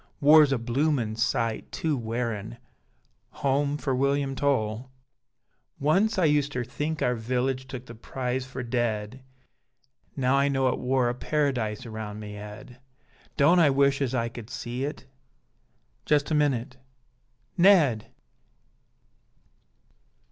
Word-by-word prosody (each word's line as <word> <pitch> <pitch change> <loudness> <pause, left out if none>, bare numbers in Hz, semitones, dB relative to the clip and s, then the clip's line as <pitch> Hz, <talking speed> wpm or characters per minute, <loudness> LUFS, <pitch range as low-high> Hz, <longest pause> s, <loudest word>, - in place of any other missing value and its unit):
War's 150 0 +7
a 135 - +2
bloomin 120 -1 0
sight 115 0 -1
too 160 -2 -1
wearin: 115 - -4 0.9
Home 140 +1 +1
for 140 -2 -2
William 140 +1 +1
Towl! 130 -3 -1 0.9
Once 195 +10 +2
I 175 -4 +4
uster 145 -4 +1
think 150 +6 -3
our 125 - +2
village 130 +3 -2
Took 130 -2 -7
the 115 - -10
prize 125 +2 -3
for 130 0 -7
dead, 120 0 -2 0.9
Now 130 0 +2
I 140 +1 +3
know 135 -2 +2
it - - -2
wor 130 -1 +1
a 120 - 0
Para 145 +2 0
dise 110 -1 -3
around 110 -2 -6
me 105 -1 -8
head; 105 +5 -10 0.6
Don't 165 +5 +5
I 160 -4 +6
wish 140 0 +2
as 130 -2 0
I 115 -2 0
could 115 -1 -9
see 125 +2 -4
it 150 - -6 1.0
Just 150 0 +2
a - - +2
minute 135 -3 0 0.8
Ned! 165 - +4
130 Hz, 130 wpm, -26 LUFS, 115-145 Hz, 1.0 s, War's